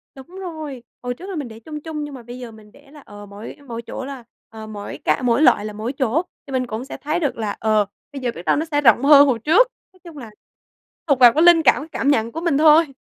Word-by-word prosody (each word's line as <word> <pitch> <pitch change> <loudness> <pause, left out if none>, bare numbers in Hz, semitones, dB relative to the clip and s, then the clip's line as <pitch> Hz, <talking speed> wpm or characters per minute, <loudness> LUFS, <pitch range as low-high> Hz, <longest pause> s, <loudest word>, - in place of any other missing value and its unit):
Đúng 265 0 -13
rồi. 320 -8 -8 0.2
Hồi 245 0 -3
trước 370 +10 -11
là 385 - -5
mình 290 -5 -4
để 225 -1 -12
chung 300 +5 -8
chung 310 -2 -5
nhưng 295 -1 -7
mà 255 -3 -10
bây 245 +2 -10
giờ 245 -2 -8
mình 215 -1 -17
để 280 +3 -21
là, 295 -1 -15
ờ, 205 0 -12
mỗi 205 +2 -10
mỗi 235 -1 -6
chỗ 260 - -7
là, 270 -2 -8 0.3
ờ, 220 -1 -10
mỗi 205 -1 -8
cạ - - +1
mỗi 240 +2 +2
loại 210 -8 +4
là 215 - -6
mỗi 220 +5 -4
chỗ, 265 +3 0 0.3
thì - - -10
mình 255 -1 -1
cũng 225 +2 -5
sẽ - - -8
thấy 305 +4 -2
được 290 -8 -2
là, 210 -3 -3
ờ, 215 -1 +2 0.3
bây 275 - -7
giờ 245 -2 -1
biết 170 - -10
đâu 155 - +3
nó 310 - -1
sẽ 290 0 +1
rộng 235 -1 +4
hơn 285 0 +7
hồi 250 -4 0
trước. 330 - +4 0.3
Nói 370 - -24
chung 335 -4 -12
là 240 -5 -9 0.8
thuộc 280 -4 +2
vào 240 -2 +8
cái 315 +3 +3
linh 345 -1 +7
cảm, 290 +2 +3
cảm 280 - -3
nhận 230 -4 +1
của 325 - -6
mình 335 -5 +1
thôi. 305 -1 +5
265 Hz, 275 wpm, -20 LUFS, 230-300 Hz, 0.8 s, vào